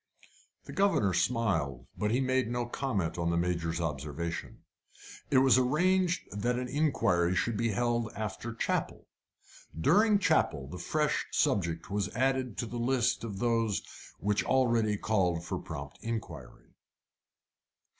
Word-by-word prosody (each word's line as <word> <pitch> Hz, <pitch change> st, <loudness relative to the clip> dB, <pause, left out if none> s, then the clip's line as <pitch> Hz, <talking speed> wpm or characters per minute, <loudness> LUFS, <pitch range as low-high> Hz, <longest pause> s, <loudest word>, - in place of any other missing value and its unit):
The -, -, -10 dB
governor 195 Hz, -, +2 dB
smiled, 90 Hz, -, 0 dB
but 105 Hz, -, -1 dB
he 120 Hz, +4 st, +2 dB
made 130 Hz, -3 st, +1 dB
no 120 Hz, 0 st, -1 dB
comment 105 Hz, -10 st, -2 dB
on 85 Hz, 0 st, 0 dB
the 85 Hz, -, +1 dB
Major's 85 Hz, -1 st, -1 dB
observation. 80 Hz, +1 st, -4 dB, 0.7 s
It 135 Hz, -, +3 dB
was 130 Hz, -2 st, +6 dB
arranged 180 Hz, +7 st, +2 dB
that 120 Hz, +4 st, -1 dB
an 125 Hz, 0 st, -3 dB
inquiry 115 Hz, -, +1 dB
should 115 Hz, +4 st, 0 dB
be 115 Hz, +2 st, 0 dB
held 120 Hz, +1 st, 0 dB
after 110 Hz, +2 st, -4 dB
chapel. 115 Hz, -, -2 dB, 0.7 s
During 210 Hz, -, +4 dB
chapel 75 Hz, -, +1 dB
a 90 Hz, -, -6 dB
fresh 150 Hz, -, 0 dB
subject 90 Hz, -, 0 dB
was 100 Hz, -1 st, -1 dB
added 130 Hz, -2 st, 0 dB
to -, -, -1 dB
the 120 Hz, +1 st, -5 dB
list 125 Hz, 0 st, +1 dB
of 105 Hz, -4 st, -5 dB
those 115 Hz, -2 st, +1 dB, 0.3 s
which 105 Hz, 0 st, 0 dB
already 115 Hz, -5 st, +2 dB
called 90 Hz, -6 st, 0 dB
for -, -, -3 dB
prompt 70 Hz, -3 st, -8 dB
inquiry. 115 Hz, -1 st, -6 dB
115 Hz, 135 wpm, -30 LUFS, 90-130 Hz, 0.7 s, was